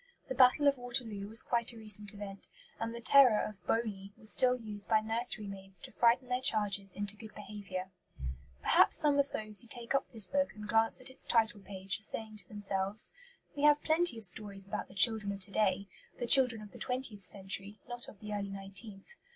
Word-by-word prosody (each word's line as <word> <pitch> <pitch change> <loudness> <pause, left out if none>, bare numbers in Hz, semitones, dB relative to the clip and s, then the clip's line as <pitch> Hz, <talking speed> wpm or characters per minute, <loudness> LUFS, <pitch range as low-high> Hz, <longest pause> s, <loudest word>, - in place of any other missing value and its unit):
The - - -2
Battle 260 +3 +4
of 280 -2 +2
Waterloo 235 -5 -3
was 220 +2 +4
quite 235 0 -1
a - - -13
recent 210 -2 +1
event; 200 -2 -9 0.3
and 225 0 -3
the 235 - -8
terror 250 -3 +6
of 210 -2 -12
"Boney" 205 -4 -2
was 215 -2 +3
still 250 -1 +2
used 210 -3 -2
by 220 - +4
nursery 225 0 -3
maids 195 -2 -6
to - - -9
frighten 240 +2 +2
their 250 0 -1
charges 205 -4 +1
into 205 0 -2
good 215 0 -13
behaviour. 190 -3 -7 0.7
Perhaps - - +5
some 290 -2 +1
of 280 0 +2
those 215 -1 -3
who 240 - -14
take 235 +1 -4
up 275 - -1
this 220 -4 +7
book 280 +8 -1
and 210 -1 -9
glance 225 +2 +1
at 260 - -5
its 260 - -6
title 225 -2 +1
page 195 0 -4
are - - -21
saying 215 0 0
to 185 -3 0
themselves. 200 0 -1 0.4
We 285 - -5
have 295 0 +4
plenty 320 -5 +3
of 225 - -1
stories 195 +1 -2
about 195 - -5
the 190 - -17
children 210 0 +3
of 200 - -8
to 195 +2 -1
day 200 -1 0 0.3
the 240 - -3
children 245 -3 +5
of 205 - -13
the - - -13
twentieth 250 -5 -3
century, 195 +2 -4
not 245 0 -1
of 205 - -16
the 210 -1 -6
early 200 -1 -3
nineteenth. 195 - -8
215 Hz, 210 wpm, -32 LUFS, 200-240 Hz, 0.7 s, this